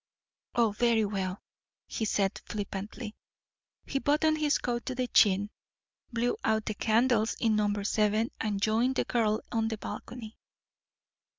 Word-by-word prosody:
"Oh, 230 -3 +3
very 225 0 +2
well," 195 -2 -3 0.4
he 220 - -3
said 200 -2 0
flippantly. 210 +2 -5 0.7
He 275 - -1
buttoned 310 +2 +2
his 295 -2 +3
coat 240 -1 -2
to 255 - -2
the 255 0 0
chin, 205 -2 +4 0.6
blew 240 +1 0
out 220 0 +1
the 215 - -2
candles 220 +1 +2
in 225 -2 +2
number 205 -1 +1
seven, 215 +2 +1
and 210 -3 -1
joined 225 +5 +2
the - - +1
girl 220 -2 +1
on 225 -1 +1
the 220 -1 -3
balcony. 225 +1 -8
220 Hz, 140 wpm, -29 LUFS, 210-240 Hz, 0.7 s, chin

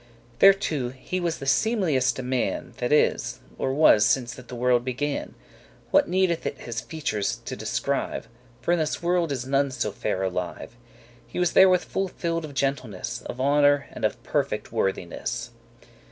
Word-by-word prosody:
Thereto 195 -10 +4
he 130 +8 -4
was 170 -2 -1
the 135 - -7
seemlieste 150 - +2
man 125 -1 -1
That 125 +1 -2
is, 150 - +2 0.2
or 130 - 0
was 135 -7 +6
since 120 +2 +2
that 125 -1 -12
the 125 - -7
world 120 0 +2
began; 135 +3 -3 0.6
What - - +4
needeth 185 -2 +1
it - - -4
his 120 -1 -4
features 145 -11 -2
to - - -4
descrive? - - -2 0.3
For 170 - 0
in 175 - +3
this 155 +2 -2
world 175 -2 +1
is 125 -3 -3
none 140 +1 +2
so 120 -5 -2
fair 95 -1 -2
alive. 90 +4 -4 0.5
He - - -9
was 180 -1 +2
therewith 185 -1 +6
full 195 0 -2
fill'd 165 -2 -3
of 145 -2 -10
gentleness, 125 -4 -2
Of 125 - -7
honour, 145 +1 +4
and - - -9
of - - -1
perfect - - -2
worthiness. 105 +5 -2
135 Hz, 165 wpm, -25 LUFS, 120-165 Hz, 0.6 s, was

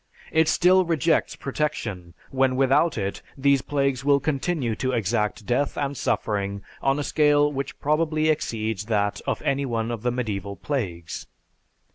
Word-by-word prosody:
It 160 0 +3
still 185 +3 +5
rejects 165 -1 +1
protection, 110 - -3 0.2
when 130 -1 +2
without 135 +4 +3
it 100 -2 -3 0.2
these 140 0 +3
plagues 140 -2 0
will 140 0 +4
continue 140 -4 -1
to 130 0 -1
exact 105 -2 -1
death 125 +5 0
and 140 0 -1
suffering 100 -5 -1 0.2
on 135 +1 +2
a 145 - -1
scale 145 0 +3
which 140 -1 -5
probably 155 +1 +1
exceeds 110 -8 -1
that 105 -2 0
of - - -1
any 140 +1 +1
one 115 -1 -1
of 115 -3 -4
the 125 - +1
medieval 105 -5 -3
plagues. 90 - -4
135 Hz, 150 wpm, -24 LUFS, 110-145 Hz, 0.2 s, still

